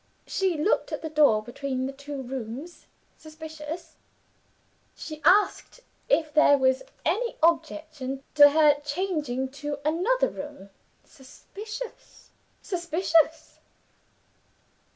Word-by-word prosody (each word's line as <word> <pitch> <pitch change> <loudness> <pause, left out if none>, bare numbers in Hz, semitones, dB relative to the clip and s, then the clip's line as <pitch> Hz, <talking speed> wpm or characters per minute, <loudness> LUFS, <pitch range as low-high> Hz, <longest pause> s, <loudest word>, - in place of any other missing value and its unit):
She 375 -4 0
looked 310 +8 +1
at - - -4
the 320 - -4
door 285 -9 +4
between 260 +2 -4
the 270 - -4
two 280 0 -7
rooms 260 +6 -7 0.3
suspicious! 315 +1 -9 1.0
She 310 -1 -8
asked 410 +7 +3 0.3
if 305 +1 +2
there 300 -2 +6
was 260 -1 +2 0.2
any 475 +1 0
objection 310 -5 0
to 290 -1 +9
her 295 -1 +4
changing 290 -4 -2
to 290 -1 -3
another 460 +11 +2
room 285 - -9 0.3
suspicious! 425 - -10 0.3
suspicious! 330 -3 0
305 Hz, 100 wpm, -26 LUFS, 275-335 Hz, 1.0 s, to